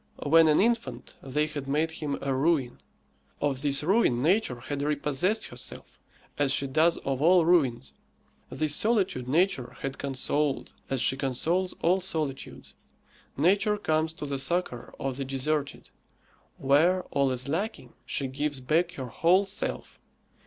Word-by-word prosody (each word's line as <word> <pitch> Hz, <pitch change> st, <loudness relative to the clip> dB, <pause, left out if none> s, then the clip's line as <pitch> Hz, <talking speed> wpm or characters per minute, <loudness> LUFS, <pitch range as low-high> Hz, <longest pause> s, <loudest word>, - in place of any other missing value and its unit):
When 160 Hz, +2 st, +6 dB
an 150 Hz, -, +4 dB
infant, 235 Hz, +2 st, -1 dB
they 150 Hz, +3 st, -1 dB
had 150 Hz, -3 st, -6 dB
made 155 Hz, +4 st, 0 dB
him 150 Hz, -3 st, -4 dB
a 135 Hz, -1 st, 0 dB
ruin; 135 Hz, -2 st, 0 dB, 0.6 s
of 140 Hz, -2 st, -1 dB
this 140 Hz, 0 st, +1 dB
ruin 165 Hz, -, +2 dB
Nature 165 Hz, -, +1 dB
had 140 Hz, +2 st, -4 dB
repossessed 150 Hz, +8 st, 0 dB
herself, -, -, -7 dB, 0.4 s
as 140 Hz, -2 st, +2 dB
she 140 Hz, 0 st, +1 dB
does 160 Hz, +5 st, +2 dB
of 135 Hz, -1 st, -1 dB
all 175 Hz, +1 st, +5 dB
ruins. 135 Hz, -8 st, +2 dB, 0.6 s
This 155 Hz, -1 st, 0 dB
solitude 195 Hz, -, +1 dB
Nature 145 Hz, -4 st, 0 dB
had 135 Hz, -1 st, -4 dB
consoled, 140 Hz, +1 st, -1 dB, 0.2 s
as 135 Hz, -2 st, -1 dB
she 135 Hz, -, +2 dB
consoles 165 Hz, +8 st, -1 dB
all 180 Hz, +3 st, +3 dB
solitudes. 155 Hz, -7 st, -5 dB, 0.6 s
Nature 200 Hz, +7 st, +3 dB
comes 160 Hz, -4 st, 0 dB
to 150 Hz, -, -7 dB
the 140 Hz, -1 st, -3 dB
succour 170 Hz, -5 st, -2 dB
of 135 Hz, -1 st, -3 dB
the 140 Hz, -, -2 dB
deserted; 140 Hz, +2 st, -3 dB, 0.7 s
where 160 Hz, +7 st, +3 dB
all 140 Hz, -1 st, +2 dB
is 130 Hz, 0 st, -2 dB
lacking, 160 Hz, -, -3 dB
she 140 Hz, -, -2 dB
gives 145 Hz, +2 st, -2 dB
back 165 Hz, +7 st, +1 dB
her 135 Hz, -6 st, -5 dB
whole 175 Hz, -, +2 dB
self. 195 Hz, +1 st, -3 dB
150 Hz, 145 wpm, -27 LUFS, 135-170 Hz, 0.7 s, When